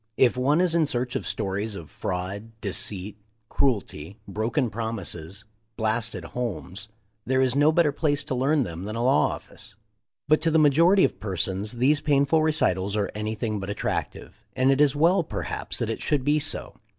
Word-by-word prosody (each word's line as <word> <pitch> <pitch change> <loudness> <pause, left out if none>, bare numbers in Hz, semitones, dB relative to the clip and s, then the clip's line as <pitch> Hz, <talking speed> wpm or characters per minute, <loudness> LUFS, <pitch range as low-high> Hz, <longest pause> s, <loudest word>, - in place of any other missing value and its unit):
If 125 -2 +4
one 140 +6 +2
is 180 -2 +2
in 165 -3 +3
search 125 -1 -2
of - - -2
stories 100 +2 -3
of 80 -5 -9
fraud, 95 +5 -4
deceit, 100 0 -3 0.3
cruelty, 100 - -1
broken 115 +5 -1
promises, 105 -5 -5 0.3
blasted 110 -3 -1
homes, 105 0 -5 0.4
there 130 +3 +1
is 130 -1 +2
no 145 +2 +5
better 160 -2 +3
place 145 0 0
to - - -4
learn 135 +3 +2
them 90 -2 -6
than 110 +2 -5
a 115 - -1
law 135 +3 +4
office. - - -9 0.5
But 155 +1 +4
to 165 - +2
the 160 - +3
majority 165 +6 +5
of - - +1
persons 95 +1 -2
these 135 +5 +2
painful 145 +1 +3
recitals 100 - +1
are 105 -2 -1
anything 110 0 -3
but 95 0 -5
attractive, 100 - -4
and 130 +1 +3
it 135 +1 +3
is 145 -1 +4
well 170 +6 +4
perhaps 165 - -4
that - - -1
it - - -5
should 145 -3 0
be 150 +2 +3
so. 145 - -4
120 Hz, 175 wpm, -25 LUFS, 100-145 Hz, 0.5 s, no